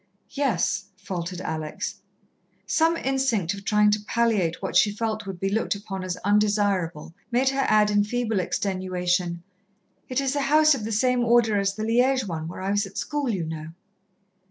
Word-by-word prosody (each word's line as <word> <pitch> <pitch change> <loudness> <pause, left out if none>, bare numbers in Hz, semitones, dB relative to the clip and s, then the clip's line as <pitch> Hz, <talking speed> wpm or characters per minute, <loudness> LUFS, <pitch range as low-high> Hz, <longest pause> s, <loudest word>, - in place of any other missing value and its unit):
"Yes," 235 - 0
faltered 180 -2 -5
Alex. 155 -3 -4 0.7
Some 330 +1 +2
instinct 260 - 0
of 200 0 -9
trying 210 0 +3
to 210 - +1
palliate 215 -8 +1
what 190 - -4
she 205 - +5
felt 215 0 -3
would 190 -2 -6
be 195 - -1
looked 210 +1 0
upon 195 -2 -6
as 185 -1 -3
undesirable 205 -6 +1 0.2
made 255 +2 +2
her 270 0 0
add 210 -1 +4
in 205 0 +3
feeble 225 -1 -1
extenuation, 180 -2 -1 0.7
"It 255 +1 0
is 275 0 -1
a 285 - +1
house 305 +2 +5
of 235 -6 -3
the 225 - -3
same 250 +3 +2
Order 230 -3 +3
as 195 0 0
the 215 - -4
Liège 250 +2 +2
one 160 -3 -4
where 175 - -7
I 195 +1 -1
was 205 0 +1
at 195 - -12
school, 295 -3 -2
you 185 -7 -1
know." 160 0 -6
205 Hz, 180 wpm, -25 LUFS, 185-240 Hz, 0.7 s, she